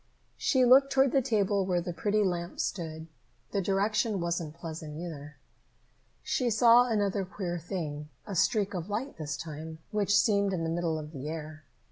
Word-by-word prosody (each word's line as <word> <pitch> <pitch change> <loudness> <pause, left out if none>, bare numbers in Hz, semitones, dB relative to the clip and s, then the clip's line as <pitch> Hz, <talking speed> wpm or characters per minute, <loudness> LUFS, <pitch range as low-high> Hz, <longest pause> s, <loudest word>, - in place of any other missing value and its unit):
She 260 -3 +3
looked 270 +3 +6
toward 270 -1 +4
the 275 - +3
table 205 -5 +1
where 180 -2 +1
the 175 0 -4
pretty 210 +4 +1
lamp 175 -2 -2
stood. 160 -3 -3 0.5
That 200 -2 0
direction 205 +2 +1
wasn't 170 -2 -2
pleasant 160 -2 -7
either. 155 -3 -7 0.9
She 250 -2 0
saw 235 +2 +6
another 205 -3 +1
queer 180 -2 -4
thing, 155 -4 -5 0.2
a 200 - -5
streak 200 +3 +2
of 180 +1 -4
light 235 +7 -3
this 150 -2 -4
time, 160 0 -7
which 205 -1 +2
seemed 200 -2 +3
in 170 -3 -1
the 165 - -1
middle 165 -1 -1
of 150 -1 -7
the 145 -1 -6
air. 155 -1 -7
185 Hz, 170 wpm, -29 LUFS, 160-210 Hz, 0.9 s, looked